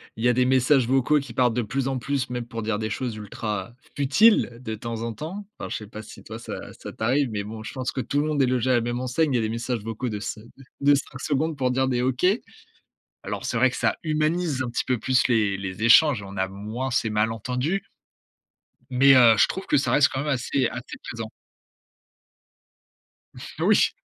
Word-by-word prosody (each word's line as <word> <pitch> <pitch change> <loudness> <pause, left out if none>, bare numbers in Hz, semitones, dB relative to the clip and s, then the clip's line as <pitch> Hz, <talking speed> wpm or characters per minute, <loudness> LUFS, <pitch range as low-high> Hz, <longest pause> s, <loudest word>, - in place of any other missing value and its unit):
il 110 - -6
y 125 - +5
a - - +4
des 125 +1 +2
messages 130 0 +3
vocaux 135 +3 +3
qui 130 -4 -8
partent 125 -2 +2
de 125 - +1
plus 135 +5 -2
en 135 - -1
plus, 130 0 -2
même 125 -1 -4
pour 115 -1 -6
dire 105 -1 -1
des 110 -1 -2
choses 115 +2 -3
ultra 105 0 -5 0.2
futiles 140 - +4
de 110 -3 -4
temps 115 +1 -5
en 115 - -3
temps. 175 - -7
Enfin, - - -5
je - - -3
sais 105 - -9
pas 110 +1 -8
si 110 - -13
toi - - -8
ça - - -7
ça - - -9
t'arrive, 130 +4 +1
mais, 105 -1 -3
bon, 110 +1 -8
je - - -7
pense 130 -2 -3
que - - -5
tout 145 +5 0
le 150 - -1
monde 150 -2 +1
est - - +5
logé 125 0 0
à - - +4
la 120 - +2
même 120 +1 -2
enseigne. 135 +4 0
Il - - +2
y - - +3
a - - 0
des 110 - -1
messages 115 0 -3
vocaux 115 +3 -4
de 105 -2 -4
5 105 +2 -6 0.4
de 145 +1 +5
5 135 -2 -5
secondes 150 +2 -1
pour 130 -2 +1
dire 130 +1 +1
des 125 -1 0
OK. 130 +5 0 1.0
Alors, - - -5
c'est - - -1
vrai - - +4
que - - -7
ça - - +1
humanise 155 -2 0
un 120 - -4
petit 120 - -2
peu 125 - +1
plus 125 +3 +2
les 105 -5 +2
les 95 +1 -5
échanges. 115 0 +6
On 100 0 -9
a 95 0 0
moins 105 +7 -5
ces 120 -3 0
malentendus 125 - -1 1.1
mais, 135 +2 +6
heu, 120 -3 +7
je - - +5
trouve 190 - -5
que - - +2
ça 140 - +1
reste 145 -1 +5
quand 135 - -3
même 150 - -3
assez 135 -1 0
assez 120 +2 -7
présent. 115 -2 -6 2.3
Oui! - - +4
125 Hz, 230 wpm, -24 LUFS, 110-135 Hz, 2.3 s, heu